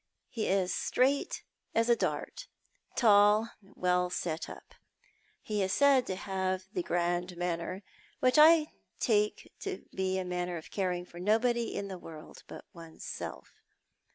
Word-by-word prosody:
He 220 - -2
is 185 -2 +1
straight 275 +2 +1 0.3
as 230 +1 +3
a 240 - +5
dart, - - -3 0.5
tall, 210 0 +5
well 180 -2 0
set 165 -2 -3
up. - - -12 0.7
He 210 -1 -1
is 190 0 0
said 280 -3 +4
to 190 - -2
have 190 -1 -2
the 180 - 0
grand 175 +1 -1
manner, 175 +2 -3 0.4
Avhich 255 +3 +5
I 310 0 +7 0.3
take 210 -2 +1
to 390 -2 -5
be 190 0 -1
a 185 - -2
manner 180 -1 -2
of 160 - -11
caring 180 -3 -1
for 175 -1 -12
nobody 230 +4 +1
in 200 - -3
the 190 -2 -7
world 155 -2 -11
but - - -10
one's 165 -2 -12
self. - - -7
190 Hz, 150 wpm, -31 LUFS, 180-230 Hz, 0.7 s, I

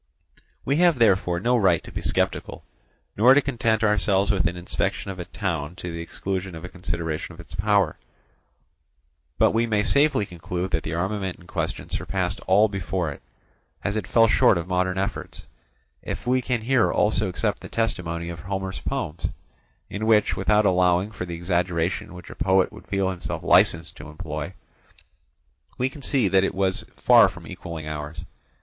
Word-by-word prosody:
We 140 +2 +1
have 175 -3 +4
therefore 95 -6 +3
no 120 +6 +2
right 95 -8 +3
to - - -10
be - - -5
sceptical, - - -1 0.5
nor 125 +6 +6
to - - +7
content 115 -4 0
ourselves 105 -2 +3
with 90 -4 +1
an 85 +1 -3
inspection 90 +2 -2
of 95 - -9
a 90 - -4
town 85 -6 -3
to 90 -2 -6
the 85 - -5
exclusion 95 +1 -4
of 80 +1 -8
a - - -7
consideration 85 -3 -4
of 80 - -16
its 85 - -12
power; 100 -3 +2 1.4
but - - +4
we 115 +1 +1
may 105 -2 +1
safely 140 -2 +3
conclude 90 +1 -5
that 80 - +1
the 80 - -4
armament 95 +1 -2
in 90 - -17
question 85 -2 -3
surpassed 95 -1 -2
all 100 +3 +5
before 95 -4 -2
it, 70 - -10 0.6
as 100 - -1
it 110 -4 -2
fell 115 -1 +5
short 105 -3 +4
of 85 0 -4
modern 90 0 0
efforts; 95 +2 -4 0.6
if - - -6
we 130 +1 +2
can 125 -2 -1
here 125 +1 +2
also - - +1
accept - - -1
the - - -9
testimony 85 -7 -2
of 85 -1 -7
Homer's 95 +1 -4
poems, 110 - -3 0.6
in 110 +2 -4
which, 105 -2 +4
without 105 0 +2
allowing 90 +1 +3
for 90 -4 -6
the 85 - -5
exaggeration 85 0 -1
which 90 - -10
a - - -10
poet 95 0 +2
would - - -13
feel 95 -1 0
himself 90 -2 -5
licensed 85 0 +3
to 75 +1 -9
employ, 75 +2 -6 1.2
we 125 +1 +1
can 140 +2 -12
see 130 -5 +1
that 95 0 +3
it 95 - -1
was 95 -1 0
far - - +6
from - - -12
equalling 80 -3 -7
ours. 75 +1 -5
95 Hz, 180 wpm, -24 LUFS, 85-105 Hz, 1.4 s, to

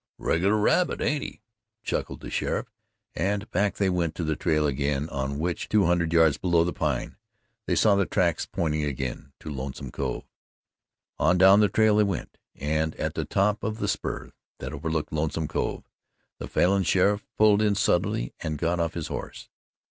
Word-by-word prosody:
"Regular 100 +6 +1
rabbit, 175 +12 +2
ain't 145 -1 0
he?" - - -8 0.4
chuckled - - -3
the - - -8
sheriff, - - -2 0.4
and 100 +5 -1
back 100 +1 +1
they 100 - +1
went 85 -3 0
to 85 - -3
the 80 -1 0
trail 75 -2 +1
again 70 +1 -1
on 70 -1 -3
which 85 +2 -2
two 105 -2 +3
hundred 85 -1 +1
yards 80 -3 +4
below 85 -2 +3
the 90 - -2
Pine 75 -6 -2 0.5
they - - +1
saw 105 - +4
the 100 -1 +2
tracks 85 -3 +1
pointing 75 -2 -1
again 70 -1 -4
to 75 - -6
Lonesome 65 0 -6
Cove. - - -3 1.0
On 90 +2 +3
down 95 +2 +7
the 105 -1 +4
trail 110 -1 +3
they 105 - +5
went, 100 -3 -4 0.2
and 80 +2 -1
at - - -3
the - - -3
top 105 +2 +1
of 110 +1 -2
the - - -2
spur - - -3 0.3
that - - -6
overlooked 80 +1 -3
Lonesome 80 +1 -1
Cove, - - -3 0.5
the - - -5
Falin 95 +2 +2
sheriff 100 +3 +2
pulled 105 -1 +5
in 105 -1 +2
suddenly - - 0
and 75 -1 -3
got 85 +3 0
off 85 0 -1
his 85 -3 -3
horse. - - -7
85 Hz, 180 wpm, -26 LUFS, 75-100 Hz, 1.0 s, down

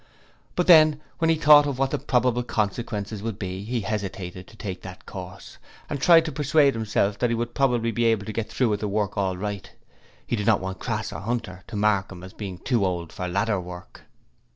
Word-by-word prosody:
But 180 - +1
then, 155 -4 +7 0.2
when 165 -1 +2
he 165 - +4
thought 150 -1 +7
of 140 -3 -3
what 135 0 0
the - - -1
probable 125 -1 +1
consequences 105 -2 -3
would 110 -2 -4
be, 95 -1 -5
he 120 +2 -2
hesitated 95 -3 -5
to 110 - -17
take 95 -4 -6
that - - -10
course, - - -9 0.3
and 140 - -3
tried 165 0 +6
to 155 - -3
persuade 145 0 +3
himself 105 -2 0
that 120 - +2
he 115 - +1
would 120 +1 -3 0.4
be 120 - +1
able 110 -3 +2
to 110 - -5
get 110 0 -3
through 120 0 +1
with 105 -1 0
the 105 - -2
work 105 0 -1
all 95 -3 -1
right. 100 0 -5 0.6
He - - -1
did 105 -2 -3
not 110 -3 +5
want 95 0 -5
Crass 110 -3 -3
or - - -5
Hunter 100 -4 -4
to 115 - -8
mark 100 -2 +1
him 90 -1 -10
as 95 - -10
being 95 -4 -6
too 120 +1 0
old 85 -3 -2
for 90 - -4
ladder 100 +2 0
work. 90 0 -11
110 Hz, 220 wpm, -25 LUFS, 95-125 Hz, 0.6 s, then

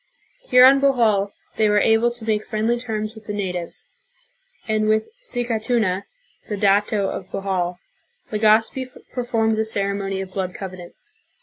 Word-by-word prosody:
Here 250 0 +8
on 270 +1 +7
Bohol 225 -8 +3 0.3
they 215 -1 +3
were 210 - +3
able 225 +3 +3
to 240 -2 -7
make 215 -1 0
friendly 225 +2 -1
terms 215 -3 -4
with 220 -2 -14
the 210 - -3
natives, 180 -4 -4 0.8
and 215 -1 +1
with 215 0 +2
Sicatuna, 230 - -1 0.4
the 210 - -2
dato 200 0 +2
of 185 - -5
Bohol, 180 -3 -2 0.5
Legazpi 220 +4 +3 0.3
performed 225 -3 0
the 220 - +2
ceremony 200 -2 -2
of 190 -1 -6
blood 185 -2 -3
covenant. 185 -2 -8
215 Hz, 140 wpm, -22 LUFS, 195-225 Hz, 0.8 s, Here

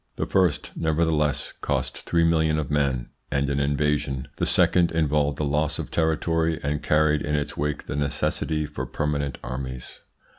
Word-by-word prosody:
The - - -2
first, 90 -6 +1
nevertheless, 80 -2 +1
cost - - -1
three 85 -1 +3
millions 80 -2 +3
of 75 -2 -3
men 70 -4 0 0.2
and 70 0 0
an 70 0 0
invasion, 70 -1 0
the - - 0
second 90 -2 +4
involved 75 -3 +1
a - - 0
loss 75 +1 +1
of - - -5
territory, 80 0 +1
and 75 +1 -1
carried 75 -1 +3
in 75 - -1
its 75 0 -2
wake 75 0 -2
the - - -4
necessity 75 +2 0
for - - -5
permanent 70 -2 -2
armies. 65 0 -6
75 Hz, 160 wpm, -25 LUFS, 70-80 Hz, 0.2 s, second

